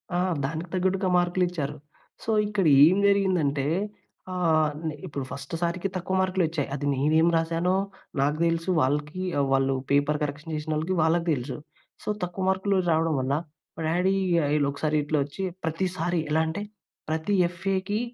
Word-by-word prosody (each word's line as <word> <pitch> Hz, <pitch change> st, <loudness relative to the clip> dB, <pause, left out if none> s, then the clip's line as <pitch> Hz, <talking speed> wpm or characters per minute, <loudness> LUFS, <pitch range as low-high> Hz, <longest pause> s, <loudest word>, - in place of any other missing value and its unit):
ఆ! -, -, +2 dB, 0.3 s
దానికి 160 Hz, +4 st, -4 dB
తగ్గట్టుగా 185 Hz, +1 st, +1 dB
మార్కులిచ్చారు. 175 Hz, -4 st, 0 dB, 0.5 s
సో, 225 Hz, -, -1 dB, 0.2 s
ఇక్కడ 205 Hz, -3 st, 0 dB, 0.2 s
ఏం 185 Hz, +4 st, +4 dB
జరిగిందంటే, 180 Hz, -9 st, +2 dB, 0.7 s
ఆహ్, 160 Hz, -4 st, +2 dB, 0.2 s
నే 155 Hz, -, -2 dB
ఇప్పుడు 140 Hz, -4 st, -4 dB
ఫస్ట్ 135 Hz, -, -7 dB
సారికి 175 Hz, +3 st, -1 dB
తక్కువ 185 Hz, +1 st, -2 dB
మార్కులొచ్చాయి. 175 Hz, -6 st, 0 dB
అది 145 Hz, 0 st, -4 dB
నేనేం 155 Hz, +5 st, +3 dB
రాసానో 165 Hz, +3 st, +1 dB, 0.5 s
నాకు 145 Hz, +2 st, +1 dB
తెలుసు. 165 Hz, +2 st, -1 dB
వాళ్ళకి, 150 Hz, +6 st, -1 dB, 0.3 s
వాళ్ళు 135 Hz, 0 st, +2 dB, 0.2 s
పేపర్ 145 Hz, +1 st, +2 dB
కరెక్షన్ 150 Hz, +3 st, -4 dB
చేసినోళ్ళకి 155 Hz, +4 st, -1 dB
వాళ్ళకి 165 Hz, +2 st, +2 dB
తెలుసు. 125 Hz, -1 st, -4 dB, 0.5 s
సో, -, -, -4 dB
తక్కువ 180 Hz, +2 st, -3 dB
మార్కులు 190 Hz, +1 st, +1 dB
రావడం 160 Hz, 0 st, +2 dB
వల్ల 130 Hz, +2 st, -1 dB, 0.4 s
మా 165 Hz, -, -4 dB
డ్యాడీ 180 Hz, +4 st, +2 dB, 0.3 s
ఆహ్, 145 Hz, -, 0 dB
ఇగ 150 Hz, -, +3 dB
ఇలా 145 Hz, -2 st, +2 dB
ఒకసారి 155 Hz, +2 st, -1 dB
ఇట్లా 150 Hz, 0 st, 0 dB
వచ్చి, 145 Hz, +7 st, -6 dB, 0.2 s
ప్రతిసారి 175 Hz, +1 st, -1 dB
ఎలా 160 Hz, +1 st, +3 dB
అంటే, 165 Hz, +6 st, -3 dB, 0.5 s
ప్రతి 160 Hz, +6 st, 0 dB
ఎఫ్ఏకి 190 Hz, +3 st, -2 dB
165 Hz, 150 wpm, -26 LUFS, 150-185 Hz, 0.7 s, ఏం